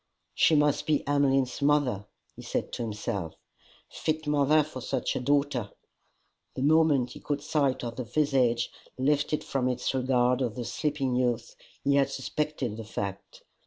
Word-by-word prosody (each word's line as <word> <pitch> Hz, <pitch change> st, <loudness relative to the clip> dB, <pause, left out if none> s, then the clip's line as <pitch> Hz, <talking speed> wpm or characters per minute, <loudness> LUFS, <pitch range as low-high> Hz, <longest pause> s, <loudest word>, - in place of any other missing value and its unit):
"She 160 Hz, -, +4 dB
must 150 Hz, -1 st, +2 dB
be 150 Hz, -2 st, +1 dB
Emmeline's 135 Hz, -2 st, +2 dB
mother," 140 Hz, -9 st, +2 dB, 0.3 s
he -, -, -10 dB
said -, -, -3 dB
to -, -, -5 dB
himself, 105 Hz, -6 st, -3 dB, 0.3 s
" -, -, -29 dB
fit 155 Hz, 0 st, -1 dB
mother 150 Hz, +1 st, +3 dB
for 140 Hz, -3 st, -8 dB
such -, -, -2 dB
a -, -, 0 dB
daughter." 140 Hz, -4 st, +1 dB, 0.9 s
The 130 Hz, -, -2 dB
moment 150 Hz, -4 st, +4 dB
he -, -, -9 dB
caught 145 Hz, -1 st, -3 dB
sight 140 Hz, -5 st, +1 dB
of 120 Hz, -1 st, -5 dB
the 130 Hz, -, -2 dB
visage 125 Hz, -3 st, +1 dB, 0.3 s
lifted 145 Hz, +3 st, +1 dB
from 130 Hz, -2 st, -1 dB
its 125 Hz, -, -1 dB
regard 125 Hz, -1 st, +2 dB
of 120 Hz, -4 st, -1 dB
the 120 Hz, -, -4 dB
sleeping 140 Hz, -1 st, -1 dB
youth, 125 Hz, -2 st, 0 dB, 0.3 s
he 140 Hz, 0 st, +3 dB
had 140 Hz, -, +3 dB
suspected 135 Hz, -4 st, -3 dB
the 115 Hz, -, -6 dB
fact. 100 Hz, -2 st, -6 dB
135 Hz, 160 wpm, -28 LUFS, 120-145 Hz, 0.9 s, She